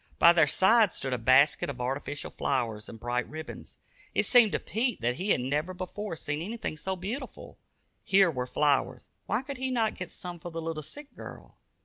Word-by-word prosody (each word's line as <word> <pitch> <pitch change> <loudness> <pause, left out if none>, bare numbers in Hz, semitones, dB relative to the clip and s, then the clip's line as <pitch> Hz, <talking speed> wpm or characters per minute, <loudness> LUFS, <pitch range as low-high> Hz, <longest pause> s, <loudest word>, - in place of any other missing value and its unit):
By 170 - +8
their 160 -3 +5
side 210 +6 +4
stood 135 -2 -2
a 125 - -1
basket 130 +7 +4
of 130 -3 -6
artificial 135 +3 -3
flowers 115 -6 -2
and 115 - -10
bright 120 +1 -2
ribbons. 155 +1 -8 0.4
It - - +2
seemed 240 -5 +6
to - - +1
Pete 235 +2 -1
that 120 +2 0
he 195 +3 -3
had 125 - +3
never 150 +8 -1
before 185 +1 -5
seen 145 -1 -3
anything 215 -2 -4
so 190 +5 -3
beautiful. 200 +10 -7 0.4
Here 190 -3 +4
were 125 -3 -3
flowers 145 +3 +1 0.2
why 225 +5 0
could 275 0 -6
he 260 0 -2
not 230 -4 +1
get 180 - -7
some 175 -1 -7
for 175 +1 -7
the 165 0 -5
little 165 -1 -4
sick 290 - -10
girl? - - -11
165 Hz, 200 wpm, -29 LUFS, 135-205 Hz, 0.4 s, By